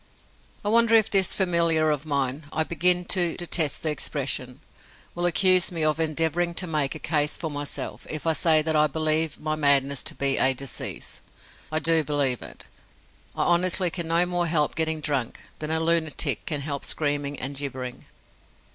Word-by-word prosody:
I - - 0
wonder 230 +1 +4
if 220 -1 +3
this 195 -2 +3
familiar 170 -4 +1
of 150 +1 -4
mine 140 0 -2
I 160 - 0
begin 180 +2 +1
to 175 -2 +1
detest 165 -4 +1
the 155 - 0
expression 135 -3 -3 0.5
will 175 0 -1
accuse 185 0 +5
me 165 -3 -2
of 155 0 +1
endeavouring 165 +2 -1
to 185 - 0
make 155 -4 -1
a - - -4
case 150 -1 +1
for 160 -3 -5
myself 145 0 -4
if 155 0 -4
I 165 - +3
say 155 0 +4
that 160 0 -1
I 150 0 +4
believe 155 +1 0
my 155 0 -3
madness 140 -2 +2
to - - -3
be 140 -1 +1
a 130 0 +5
disease? 135 0 -3 0.5
I 155 - 0
do 165 0 +2
believe 140 -4 0
it. - - -9 0.7
I - - 0
honestly 175 0 +1
can 170 -1 -4
no 170 +2 +2
more 175 -1 0
help 155 -3 0
getting 160 -1 -2
drunk 140 -5 -2 0.2
than 155 - -5
a 160 0 0
lunatic 160 -5 -1
can 150 -3 -2
help 140 -1 -5
screaming 145 -1 -1
and 135 +2 -4
gibbering. 130 -3 -6
155 Hz, 180 wpm, -24 LUFS, 145-170 Hz, 0.7 s, accuse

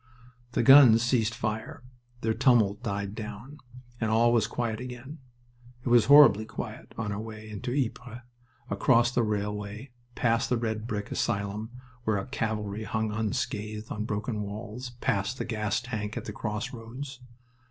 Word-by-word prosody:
The - - +2
guns 130 -5 +8
ceased 115 -2 +1
fire. 110 +2 -4 0.4
Their 110 0 +1
tumult 115 -5 +3
died 100 -3 -3
down, 110 +6 -8 0.4
and 110 - 0
all 115 +2 +4
was 110 -3 +3
quiet 115 -2 -2
again. 125 +4 -8 0.7
It - - 0
was 120 -2 +6
horribly 140 -7 +8
quiet - - -8
on 105 -2 -2
our 100 - -3
way 110 0 -8
into 105 +3 -5
Ypres, 125 -2 -3 0.5
across 120 -2 +3
the 125 - +2
railway, 105 +3 -3 0.2
past 115 -1 +1
the 125 - +2
red 110 -1 -3
brick 105 -3 -4
asylum, 105 0 -2 0.3
where 110 -3 +1
a 95 - -3
calvary 110 -4 -3
hung 110 -1 -1
unscathed 110 -1 -3
on 105 +1 -3
broken 105 +1 -2
walls, 110 +4 -6
past 100 +6 0
the - - -3
gas 105 -2 -1
tank 110 -3 -4
at - - -5
the 105 - -5
crossroads. 115 +5 -5
110 Hz, 155 wpm, -28 LUFS, 105-120 Hz, 0.7 s, guns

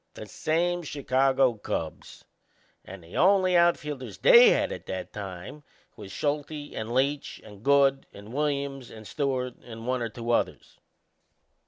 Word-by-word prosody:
The - - -8
same 175 +3 -1
Chicago 135 -3 +1
Cubs; 80 -7 -6 0.6
and 95 -2 -11
the 85 - -13
only 185 -1 +4
outfielders 150 -6 +1
they - - +8
had - - +1
at - - -8
that 95 -1 -5
time 95 +7 -8 0.3
was 95 - -10
Schulte 145 +3 -3
and 110 +1 -5
Leach 140 +3 -1
and 105 -1 -14
Good 135 +1 +3
and 105 +3 -12
Williams 140 -3 -2
and 110 -1 -12
Stewart, 130 -4 -2
and 115 -1 -10
one 125 0 -1
or 115 - -2
two 115 +2 -4
others. - - -2
135 Hz, 145 wpm, -27 LUFS, 115-150 Hz, 0.6 s, they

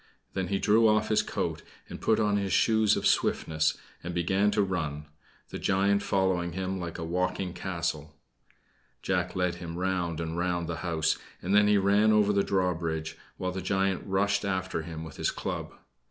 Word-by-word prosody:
Then 95 -1 -2
he 100 - 0
threw 110 +3 +4
off 110 0 +2
his 110 - +3
coat - - -3 0.3
and - - -9
put 110 - +2
on 105 -2 +2
his 100 -1 -1
shoes 110 -2 +3
of - - -3
swiftness, 80 -1 +1 0.3
and 85 0 -5
began 95 +4 +2
to 105 0 +2
run, 80 -6 -3 0.4
the - - -6
giant 100 +1 +2
following 95 -4 0
him 95 +1 -3
like 85 -2 -5
a 85 - -4
walking 90 +2 -1
castle. 85 -5 -4 0.9
Jack 90 -1 -1
led 90 -1 0
him 85 0 -6
round 90 -3 -1
and 80 0 -3
round 85 -1 -1
the 85 -1 -3
house, 80 -3 0 0.2
and 95 +3 -2
then 105 0 +6
he 105 0 +5
ran 100 +2 +4
over 105 -1 +4
the 100 - +3
drawbridge, 85 -5 -1 0.2
while 90 0 -2
the 95 +1 -4
giant 95 -1 0
rushed 100 +1 +1
after 95 -3 -2
him 80 -1 -7
with 80 - -10
his - - +1
club. - - -4
95 Hz, 185 wpm, -28 LUFS, 85-100 Hz, 0.9 s, then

